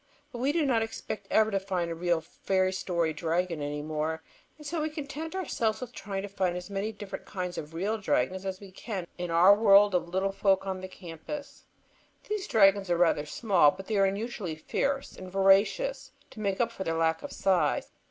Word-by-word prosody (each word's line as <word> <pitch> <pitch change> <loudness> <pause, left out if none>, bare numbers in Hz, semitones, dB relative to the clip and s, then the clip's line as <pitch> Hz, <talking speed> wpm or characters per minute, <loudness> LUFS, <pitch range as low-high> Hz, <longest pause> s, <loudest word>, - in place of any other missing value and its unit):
But 240 - -7
we 265 +4 +2
do 315 -1 +1
not 240 -5 +2
expect 225 -1 -5
ever 220 0 +3
to 195 - +1
find 185 -3 -2
a - - -1
real 170 0 0
fairy 185 +2 0
story 170 -4 -1
dragon 165 0 -1
any 145 0 -3
more, 155 +1 -2 0.3
and 300 - -13
so 320 +2 -2
we 310 - -1
content 305 +2 -6
ourselves 235 - -1
with 250 -2 -6
trying 195 -3 -5
to - - -4
find 185 -3 -1
as 180 +3 -8
many 200 +2 -2
different 205 -2 -8
kinds 180 -2 -4
of 155 +1 -7
real 205 +6 -1
dragons 185 0 0
as 190 -1 -4
we 200 -2 -12
can 190 -1 -5
in 175 -1 -3
our 170 +4 +7
world 205 -1 +6
of 170 -1 0
little 190 +2 0
folk 195 -1 +2
on 190 -1 -3
the 185 - -5
campus. 185 - -9 0.6
These 420 -3 -2
dragons 195 -5 +4
are 175 - +2
rather 165 -4 +2
small, 185 -6 +4
but 190 +6 -6
they 220 - -2
are 195 - +5
unusually 200 -3 -3
fierce 275 - -2
and 185 0 -9
voracious, 195 - +3 0.2
to 225 - -11
make 200 -2 -1
up 235 -1 +1
for 195 - -5
their 165 -2 -1
lack 160 0 +1
of - - -7
size. 180 -6 +1
195 Hz, 210 wpm, -29 LUFS, 175-220 Hz, 0.6 s, our